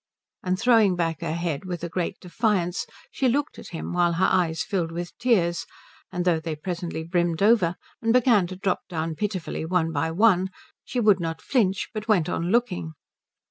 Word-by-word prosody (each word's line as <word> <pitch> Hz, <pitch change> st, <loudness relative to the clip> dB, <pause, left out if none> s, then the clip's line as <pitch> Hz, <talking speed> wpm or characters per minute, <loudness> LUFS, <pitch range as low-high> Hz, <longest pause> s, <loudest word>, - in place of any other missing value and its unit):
And 185 Hz, 0 st, -1 dB
throwing 225 Hz, -6 st, +4 dB
back 165 Hz, -3 st, -1 dB
her 160 Hz, -, -2 dB
head 170 Hz, -4 st, -2 dB
with 180 Hz, -3 st, -5 dB
a -, -, -1 dB
great 175 Hz, 0 st, -3 dB
defiance 185 Hz, -2 st, -1 dB, 0.2 s
she 265 Hz, -, 0 dB
looked 285 Hz, +4 st, -1 dB
at -, -, -10 dB
him 165 Hz, +1 st, -5 dB
while 175 Hz, -1 st, +2 dB
her 175 Hz, +3 st, +2 dB
eyes 165 Hz, -3 st, +1 dB
filled 175 Hz, -6 st, -2 dB
with 175 Hz, +1 st, -5 dB
tears; 180 Hz, -9 st, +1 dB, 0.4 s
and 180 Hz, 0 st, -2 dB
though 170 Hz, -3 st, +3 dB
they 160 Hz, -1 st, -4 dB
presently 170 Hz, 0 st, -4 dB
brimmed 170 Hz, +1 st, 0 dB
over, 205 Hz, -6 st, +4 dB, 0.3 s
and 225 Hz, -1 st, +2 dB
began 230 Hz, -6 st, +4 dB
to 185 Hz, -, -7 dB
drop 190 Hz, 0 st, 0 dB
down 165 Hz, -2 st, -2 dB
pitifully 190 Hz, -2 st, -3 dB
one 165 Hz, -1 st, 0 dB
by 155 Hz, +1 st, 0 dB
one, 190 Hz, +1 st, +3 dB, 0.3 s
she 250 Hz, -, -3 dB
would 210 Hz, -4 st, +4 dB
not 165 Hz, -1 st, -3 dB
flinch 200 Hz, -8 st, 0 dB
but 215 Hz, 0 st, -5 dB
went 190 Hz, -8 st, +3 dB
on 170 Hz, +1 st, -1 dB
looking. 190 Hz, -8 st, 0 dB
180 Hz, 185 wpm, -25 LUFS, 165-210 Hz, 0.4 s, throwing